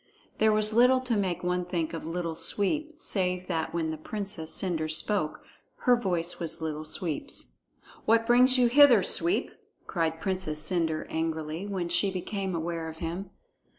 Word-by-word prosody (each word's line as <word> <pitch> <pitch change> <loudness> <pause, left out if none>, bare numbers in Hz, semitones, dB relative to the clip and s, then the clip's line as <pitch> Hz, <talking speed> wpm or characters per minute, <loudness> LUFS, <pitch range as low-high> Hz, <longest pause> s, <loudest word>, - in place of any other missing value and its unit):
There 220 0 +5
was 215 0 +2
little 250 +3 +5
to 250 -3 -1
make 185 -4 -1
one 180 0 0
think 170 -2 -3
of 165 -1 -5
Little 165 0 -3
Sweep, 300 - 0
save 180 -2 -1
that 165 -3 -2
when 165 -2 -1
the 155 - -6
Princess 195 -3 -4
Cendre 165 -4 -2
spoke, 155 0 0 0.4
her 250 - +6
voice 180 -7 -2
was 170 -2 -1
Little 155 -1 -4
Sweep's. 150 - -2 0.5
"What 230 +1 +4
brings 250 +2 +5
you 250 - +4
hither, 245 -4 +7
Sweep?" 340 - +2 0.3
cried 165 -2 -1
Princess 185 -5 -2
Cendre 160 -1 -1
angrily, 160 +2 -3
when 190 -4 -2
she 175 +3 +2
became 190 0 -3
aware 165 0 -3
of 160 - -10
him. 175 +4 -5
180 Hz, 160 wpm, -28 LUFS, 160-210 Hz, 0.5 s, hither